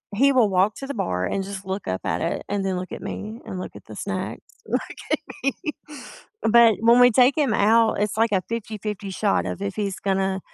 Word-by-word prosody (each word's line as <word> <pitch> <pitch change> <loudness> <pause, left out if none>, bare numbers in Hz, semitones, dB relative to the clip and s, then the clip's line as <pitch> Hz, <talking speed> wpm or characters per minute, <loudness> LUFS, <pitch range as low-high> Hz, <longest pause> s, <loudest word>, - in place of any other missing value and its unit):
he 275 +5 +5
will 245 -6 +4
walk 190 +2 +2
to 270 - -7
the 280 - -4
bar 90 - -1
and 195 - -1
just 195 0 -7
look 190 +1 -4
up 95 0 -1
at - - -1
it - - -2
and 200 -1 -2
then 190 -1 -1
look 185 +1 -6
at - - -7
me 215 +3 -6
and 190 -5 -6
look - - -7
at - - -11
the - - -8
snacks, - - -4 0.3
look - - 0 0.4
at - - -13
me. 275 - +3 0.9
But 230 -1 +6
when 230 +2 +6
we 245 0 +8
take 255 +3 +5
him 275 -7 +2
out, 220 +1 +3
it's 210 0 0
like 225 0 +2
a 190 -2 +2
50/50 210 -3 -4
shot 200 +2 0
of 195 - -4
if 195 -1 -3
he's 200 -3 -3
gonna 195 -1 0
205 Hz, 230 wpm, -23 LUFS, 190-230 Hz, 0.9 s, we